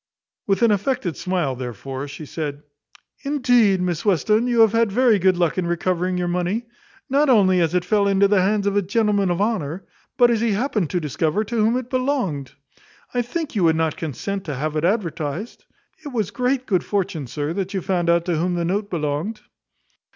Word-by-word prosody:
With 195 Hz, +3 st, +1 dB
an 230 Hz, -, +5 dB
affected 205 Hz, -, -1 dB
smile, 175 Hz, -8 st, -1 dB
therefore, 130 Hz, +3 st, -6 dB
she 145 Hz, +2 st, -8 dB
said, 145 Hz, -1 st, -5 dB, 0.6 s
"Indeed, 245 Hz, -8 st, +3 dB
Miss 175 Hz, -3 st, -2 dB
Western, 215 Hz, -, +2 dB
you 240 Hz, -2 st, +3 dB
have 220 Hz, -2 st, +6 dB
had 230 Hz, -2 st, +2 dB
very 235 Hz, -1 st, +3 dB
good 185 Hz, 0 st, +3 dB
luck 175 Hz, 0 st, +1 dB
in 175 Hz, -, -1 dB
recovering 180 Hz, +1 st, -1 dB
your 180 Hz, 0 st, -1 dB
money. 180 Hz, +6 st, -1 dB, 0.4 s
Not 280 Hz, +2 st, +2 dB
only 190 Hz, -7 st, +4 dB
as 165 Hz, +1 st, +1 dB
it 180 Hz, 0 st, +1 dB
fell 200 Hz, +1 st, +2 dB
into 200 Hz, 0 st, +4 dB
the 195 Hz, -1 st, +3 dB
hands 200 Hz, +2 st, +1 dB
of 200 Hz, 0 st, 0 dB
a 205 Hz, -, +3 dB
gentleman 200 Hz, 0 st, +1 dB
of 175 Hz, 0 st, -1 dB
honour, 195 Hz, -5 st, -2 dB, 0.3 s
but 245 Hz, -2 st, +5 dB
as 225 Hz, -2 st, +1 dB
he 230 Hz, -2 st, +1 dB
happened 210 Hz, -, -1 dB
to 180 Hz, -, 0 dB
discover 155 Hz, +5 st, -1 dB
to 235 Hz, +3 st, -6 dB
whom 225 Hz, +2 st, +2 dB
it 250 Hz, -1 st, -6 dB
belonged. 255 Hz, -, -1 dB, 0.6 s
I 245 Hz, -, +1 dB
think 300 Hz, +6 st, -4 dB
you 200 Hz, -5 st, 0 dB
would 160 Hz, -1 st, +4 dB
not 160 Hz, -1 st, 0 dB
consent 190 Hz, +6 st, -4 dB
to 150 Hz, -4 st, -4 dB
have 155 Hz, +4 st, -3 dB
it 155 Hz, -, -1 dB
advertised. 175 Hz, -1 st, -2 dB, 0.4 s
It -, -, -7 dB
was 215 Hz, -6 st, -2 dB
great 250 Hz, +3 st, 0 dB
good 185 Hz, -7 st, +1 dB
fortune, 175 Hz, -8 st, -2 dB
sir, 145 Hz, +5 st, -3 dB
that 195 Hz, +1 st, -3 dB
you 190 Hz, -, -1 dB
found 180 Hz, -3 st, 0 dB
out 170 Hz, 0 st, +3 dB
to 175 Hz, -2 st, 0 dB
whom 175 Hz, +2 st, 0 dB
the 170 Hz, -1 st, -1 dB
note 200 Hz, +4 st, -1 dB
belonged." 160 Hz, +5 st, -3 dB
190 Hz, 200 wpm, -22 LUFS, 170-220 Hz, 0.6 s, have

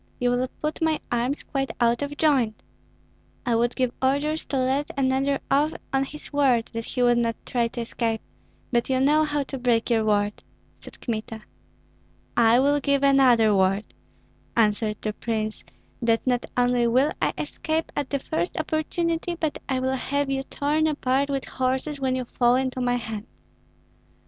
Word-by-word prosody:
You 245 Hz, 0 st, +2 dB
will 250 Hz, +1 st, +1 dB, 0.2 s
put 305 Hz, +2 st, -2 dB
my 320 Hz, -1 st, +2 dB
arms 245 Hz, +4 st, 0 dB
quite 270 Hz, -2 st, -2 dB
out 235 Hz, +1 st, +2 dB
of 285 Hz, 0 st, -4 dB
joint." 265 Hz, -8 st, +2 dB, 0.8 s
"I 240 Hz, -, +1 dB
would 235 Hz, +1 st, +1 dB
give 255 Hz, -2 st, +1 dB
orders 285 Hz, +4 st, +1 dB
to 275 Hz, -, -2 dB
let 265 Hz, +3 st, 0 dB
another 270 Hz, +1 st, +1 dB
off 295 Hz, +3 st, +2 dB, 0.2 s
on 270 Hz, 0 st, +2 dB
his 300 Hz, +2 st, -10 dB
word 260 Hz, -5 st, +3 dB
that 230 Hz, 0 st, -4 dB
he 250 Hz, -, -1 dB
would 240 Hz, -1 st, +4 dB
not 230 Hz, -1 st, 0 dB
try 240 Hz, -2 st, 0 dB
to 235 Hz, +1 st, -5 dB
escape, 230 Hz, -1 st, -2 dB, 0.5 s
but 240 Hz, 0 st, +1 dB
you 260 Hz, -1 st, +2 dB
know 300 Hz, +3 st, +4 dB
how 295 Hz, -1 st, -1 dB
to 270 Hz, 0 st, -6 dB
break 240 Hz, -1 st, +1 dB
your 225 Hz, -2 st, +3 dB
word," 205 Hz, -1 st, 0 dB, 0.4 s
said -, -, -12 dB
Kmita. 220 Hz, -1 st, -4 dB, 0.9 s
"I 235 Hz, +1 st, +5 dB
will 285 Hz, +2 st, +3 dB
give 280 Hz, -1 st, +1 dB
another 255 Hz, -6 st, +5 dB
word," 195 Hz, +2 st, +1 dB, 0.6 s
answered 210 Hz, -1 st, +2 dB
the 215 Hz, -, -1 dB
prince, 215 Hz, -1 st, -3 dB, 0.4 s
"that 230 Hz, -1 st, +1 dB
not 245 Hz, -2 st, 0 dB
only 245 Hz, -1 st, +3 dB
will 260 Hz, +6 st, +3 dB
I -, -, +1 dB
escape 315 Hz, 0 st, -2 dB
at 290 Hz, -2 st, -2 dB
the 280 Hz, -, 0 dB
first 315 Hz, +5 st, -3 dB
opportunity, 330 Hz, +2 st, -1 dB
but 315 Hz, -3 st, -2 dB
I 260 Hz, -1 st, +1 dB
will 260 Hz, +1 st, 0 dB
have 280 Hz, +2 st, -1 dB
you 270 Hz, 0 st, 0 dB
torn 295 Hz, +3 st, 0 dB
apart 280 Hz, -2 st, 0 dB
with 275 Hz, -1 st, -2 dB
horses, 265 Hz, +3 st, -2 dB
when 260 Hz, -1 st, +1 dB
you 255 Hz, -1 st, -2 dB
fall 240 Hz, 0 st, +2 dB
into 260 Hz, 0 st, -1 dB
my 245 Hz, 0 st, +1 dB
hands." 225 Hz, -2 st, -5 dB
260 Hz, 175 wpm, -25 LUFS, 235-285 Hz, 0.9 s, I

